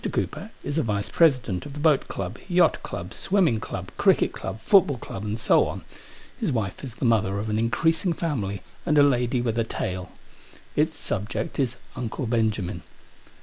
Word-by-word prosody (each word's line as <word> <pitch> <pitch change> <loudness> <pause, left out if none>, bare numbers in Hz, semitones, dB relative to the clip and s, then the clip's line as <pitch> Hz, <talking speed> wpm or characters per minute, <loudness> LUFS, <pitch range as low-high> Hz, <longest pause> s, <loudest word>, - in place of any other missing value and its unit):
Cooper - - -3
is 145 +3 -1
a - - +3
vice 105 -4 -1
president 130 - +3
of 140 - -9
the 145 - -7
boat 150 -2 +3
club, 95 +4 -5
yacht 175 -3 +3
club, 90 -1 -6
swimming 180 - +2
club, - - -6
cricket - - +4
club, 95 +3 -6
football 150 - +4
club, 95 -3 -7
and 105 +2 -3
so - - +4
on; - - -6 0.6
his - - 0
wife 105 -7 -2
is 125 -4 -7
the - - -3
mother 105 -4 +2
of 105 +2 -3
an 105 +1 +1
increasing 165 - +2
family, 110 - -2 0.2
and 155 -3 +2
a 145 - +8
lady 125 -3 +2
with 115 -1 0
a - - +3
tale. 95 -4 -4 0.6
Its - - +1
subject 105 +5 -3
is 130 -2 +1 0.2
Uncle 125 +2 -3
Benjamin. 110 -5 0
115 Hz, 180 wpm, -25 LUFS, 105-145 Hz, 0.6 s, a